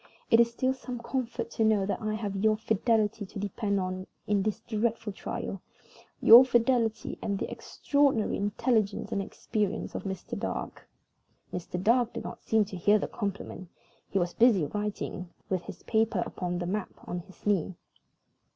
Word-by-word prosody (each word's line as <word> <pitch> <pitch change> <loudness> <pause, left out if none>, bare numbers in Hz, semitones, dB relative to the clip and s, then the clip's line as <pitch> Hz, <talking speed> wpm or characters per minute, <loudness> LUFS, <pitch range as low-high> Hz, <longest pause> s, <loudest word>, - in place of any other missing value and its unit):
It 230 - +7
is 235 0 +6
still 255 +3 0
some 255 -1 -6
comfort 235 -1 -3
to 225 - 0
know 215 -3 +3
that 200 - -2
I 215 0 -1
have 205 -2 -3
your 215 +2 +3
fidelity 220 0 +1
to 195 - -9
depend 200 0 -1
on 185 0 -3 0.2
in 205 -1 +2
this 210 +1 -1
dreadful 225 -1 -1
trial 195 -1 -5 0.6
your 235 +3 +10
fidelity 235 -3 +1
and 200 -1 -1
the - - -3
extraordinary 280 -6 +1
intelligence 210 0 0
and 200 - 0
experience 210 +1 -2
of - - -5
Mr. 190 -1 -4
Dark." - - -5 0.6
Mr. 180 0 -4
Dark 235 +5 +3
did - - -5
not - - -7
seem 220 -1 +2
to 195 - -8
hear 205 +4 +4
the - - -2
compliment. 200 -4 -5 0.4
He - - -1
was 175 -2 0
busy 225 -9 +5
writing, 205 -1 -4 0.2
with 185 -3 -1
his - - -9
paper 220 -4 +1
upon 180 -1 -3
the 175 - -3
map 195 +3 -2 0.2
on 175 - -3
his 190 +2 -16
knee. 190 -3 +1
210 Hz, 170 wpm, -29 LUFS, 195-230 Hz, 0.6 s, your